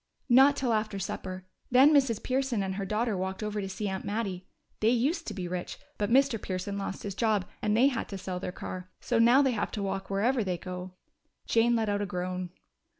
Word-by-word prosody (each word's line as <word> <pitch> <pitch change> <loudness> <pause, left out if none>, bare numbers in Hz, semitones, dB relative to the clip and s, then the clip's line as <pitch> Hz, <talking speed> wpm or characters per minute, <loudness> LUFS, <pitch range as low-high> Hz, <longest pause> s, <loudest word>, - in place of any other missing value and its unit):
"Not 270 +3 +7
till 250 -4 0
after 215 -2 -1
supper. 185 -1 -5 0.2
Then 265 +5 +6
Mrs. 265 -7 +3
Pearson 255 -5 0
and 190 0 -2
her 195 0 -3
daughter 215 +1 0
walked 190 +2 -3
over 210 0 -2
to 195 - -4
see 205 +2 -3
Aunt 190 -1 -3
Mattie. 200 -4 -3 0.3
They 215 - +3
used 280 +8 +1
to - - -4
be 180 -3 -4
rich, 180 0 -4 0.2
but 205 -1 0
Mr. 260 -3 +3
Pearson 185 +2 -3
lost 195 -1 -4
his 200 - -4
job, 210 -2 +1 0.2
and 210 0 +1
they 250 - +6
had 250 -5 0
to 195 - -5
sell 185 -1 -4
their 180 - -4
car. 185 0 -7
So 240 -2 0
now 240 +5 +6
they 265 - +3
have 210 -4 -1
to 205 - -2
walk 195 0 -3
wherever 225 +5 +1
they 185 -3 -2
go." 180 +1 -7 0.5
Jane 235 +1 +3
let 225 -1 +1
out 205 0 0
a 205 - -2
groan. 180 -1 -3
205 Hz, 220 wpm, -29 LUFS, 190-235 Hz, 0.5 s, Not